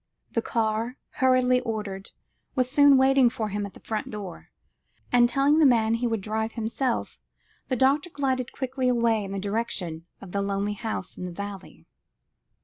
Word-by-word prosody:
The 230 Hz, -, 0 dB
car, 225 Hz, +2 st, -1 dB, 0.2 s
hurriedly 255 Hz, -1 st, +4 dB
ordered, 210 Hz, -4 st, -4 dB, 0.5 s
was 255 Hz, -2 st, +2 dB
soon 285 Hz, -1 st, +6 dB
waiting 265 Hz, -1 st, +5 dB
for 220 Hz, -2 st, -3 dB
him 205 Hz, 0 st, -3 dB
at 200 Hz, -, -15 dB
the -, -, -12 dB
front 215 Hz, -1 st, -4 dB
door; 200 Hz, -5 st, -8 dB, 0.6 s
and, 240 Hz, -1 st, +5 dB
telling 280 Hz, +4 st, +3 dB
the -, -, +5 dB
man 225 Hz, -3 st, +3 dB
he 235 Hz, +1 st, 0 dB
would 225 Hz, -3 st, -1 dB
drive 220 Hz, +2 st, -2 dB
himself, 230 Hz, +2 st, -2 dB, 0.5 s
the 260 Hz, -, 0 dB
doctor 275 Hz, +6 st, +2 dB
glided 260 Hz, -5 st, -1 dB
quickly 260 Hz, -1 st, -1 dB
away 230 Hz, -3 st, +2 dB
in 195 Hz, -, -6 dB
the 195 Hz, -, -3 dB
direction 195 Hz, -5 st, -3 dB
of 190 Hz, -, -11 dB
the 200 Hz, -, -1 dB
lonely 200 Hz, +1 st, -1 dB
house 205 Hz, -2 st, -5 dB
in 180 Hz, -, -4 dB
the 180 Hz, -, -5 dB
valley. 200 Hz, +1 st, -8 dB
230 Hz, 170 wpm, -26 LUFS, 205-255 Hz, 0.6 s, soon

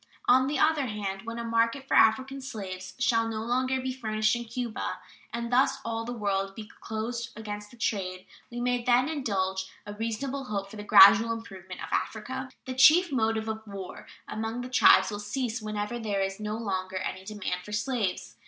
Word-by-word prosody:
On 260 Hz, +1 st, +5 dB
the 295 Hz, -, -1 dB
other 310 Hz, -4 st, +3 dB
hand, 205 Hz, -1 st, -4 dB
when 230 Hz, 0 st, -4 dB
a 235 Hz, -, -3 dB
market 230 Hz, +4 st, 0 dB
for -, -, -2 dB
African 265 Hz, +5 st, +4 dB
slaves 190 Hz, -7 st, -7 dB
shall 230 Hz, -2 st, +2 dB
no 220 Hz, -1 st, -3 dB
longer 255 Hz, +2 st, 0 dB
be 260 Hz, 0 st, -3 dB
furnished 215 Hz, -3 st, 0 dB
in 240 Hz, 0 st, -4 dB
Cuba, 235 Hz, 0 st, -4 dB, 0.3 s
and 235 Hz, +1 st, -4 dB
thus 270 Hz, +2 st, +4 dB
all 225 Hz, 0 st, -2 dB
the 240 Hz, -, -4 dB
world 195 Hz, -4 st, -1 dB
be 220 Hz, -2 st, -8 dB
closed 230 Hz, +2 st, -4 dB
against 210 Hz, -1 st, -6 dB
this 235 Hz, +1 st, -8 dB
trade, 185 Hz, -3 st, -2 dB, 0.2 s
we 240 Hz, -, -6 dB
may 245 Hz, 0 st, +1 dB
then 250 Hz, +2 st, +4 dB
indulge 190 Hz, -10 st, -2 dB
a 205 Hz, -, -6 dB
reasonable 240 Hz, +6 st, -3 dB
hope 200 Hz, -3 st, -4 dB
for -, -, -9 dB
the 210 Hz, -, -6 dB
gradual 200 Hz, +3 st, +8 dB
improvement 190 Hz, -5 st, -7 dB
of -, -, -6 dB
Africa. 255 Hz, +4 st, -3 dB, 0.2 s
The 260 Hz, -, -4 dB
chief 320 Hz, +7 st, +6 dB
motive 220 Hz, -3 st, 0 dB
of 220 Hz, 0 st, -3 dB
war 195 Hz, -2 st, -8 dB, 0.2 s
among 225 Hz, +2 st, -3 dB
the 250 Hz, -, -6 dB
tribes 255 Hz, -, +6 dB
will 205 Hz, -, -4 dB
cease 230 Hz, +2 st, -3 dB
whenever 215 Hz, +2 st, -3 dB
there 205 Hz, -3 st, -1 dB
is 195 Hz, +1 st, -3 dB
no 210 Hz, 0 st, -3 dB
longer 190 Hz, -4 st, -3 dB
any 185 Hz, 0 st, -4 dB
demand 190 Hz, -3 st, -4 dB
for 210 Hz, -, -10 dB
slaves. 210 Hz, -2 st, -2 dB
225 Hz, 190 wpm, -28 LUFS, 205-245 Hz, 0.3 s, gradual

